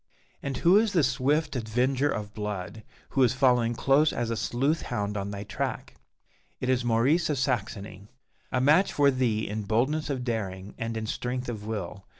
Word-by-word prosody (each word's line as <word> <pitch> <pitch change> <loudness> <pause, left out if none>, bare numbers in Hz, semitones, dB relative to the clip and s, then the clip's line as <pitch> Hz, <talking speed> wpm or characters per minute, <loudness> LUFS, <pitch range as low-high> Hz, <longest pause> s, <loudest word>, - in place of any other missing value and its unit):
And 140 -2 -3
who 180 +6 +5
is 220 -1 +2
the 170 -5 +3
swift 140 +4 +1
"avenger 125 +4 +1
of 105 -5 -4
blood" 105 0 -5 0.3
who 135 - 0
is 125 -1 +4
following 125 -3 +3
close 140 +5 +3
as 115 -1 -2
a - - 0
sleuth 135 +8 0
hound 105 -4 -3
on 100 0 -3
thy 100 0 -5
track? 105 - -4 0.7
It 130 - -2
is 130 -1 +2
Maurice 125 +9 +2
of 150 - 0
Saxony 105 -6 -3 0.4
a 130 - +1
match 150 +9 +4
for 140 -1 +4
thee 120 -4 0
in 105 +2 -3
boldness 130 +9 0
of 130 -3 -2
daring, 100 -5 -4
and 115 0 -3
in 110 - -3
strength 125 +3 -3
of 105 -3 -6
will. 100 -3 -5
120 Hz, 180 wpm, -27 LUFS, 105-135 Hz, 0.7 s, who